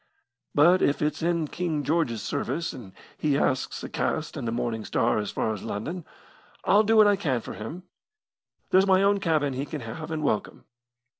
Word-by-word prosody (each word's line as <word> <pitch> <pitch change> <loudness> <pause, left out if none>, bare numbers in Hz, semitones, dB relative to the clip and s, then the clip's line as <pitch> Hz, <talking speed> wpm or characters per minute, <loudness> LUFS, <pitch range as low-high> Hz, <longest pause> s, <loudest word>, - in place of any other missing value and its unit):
But 175 +5 +6
if 145 - +2
it's 150 - -1
in 170 -1 0
King 160 -3 -2
George's 145 -9 0
service, 170 0 -2
and 110 -7 -10 0.3
he 145 -2 +2
asks 130 -2 -1
a - - -4
cast 160 -1 -2
in 140 -5 -4
the 115 - -1
Morning 115 -2 -2
Star 115 +1 +1
as 105 - -3
far 110 - -1
as 105 - -7
London, 155 - -5 0.6
I'll 205 +2 +5
do 220 +1 +3
what 215 - +8
I 205 0 +5
can 145 -11 -1
for - - -8
him. 150 +12 -7 0.9
There's 190 +1 +5
my 190 0 +5
own 200 0 +3
cabin 155 -6 +1
he 135 +2 -3
can 155 -3 -5
have 140 +8 -7
and 155 -1 -3
welcome. 110 -7 -2
150 Hz, 195 wpm, -26 LUFS, 120-175 Hz, 0.9 s, what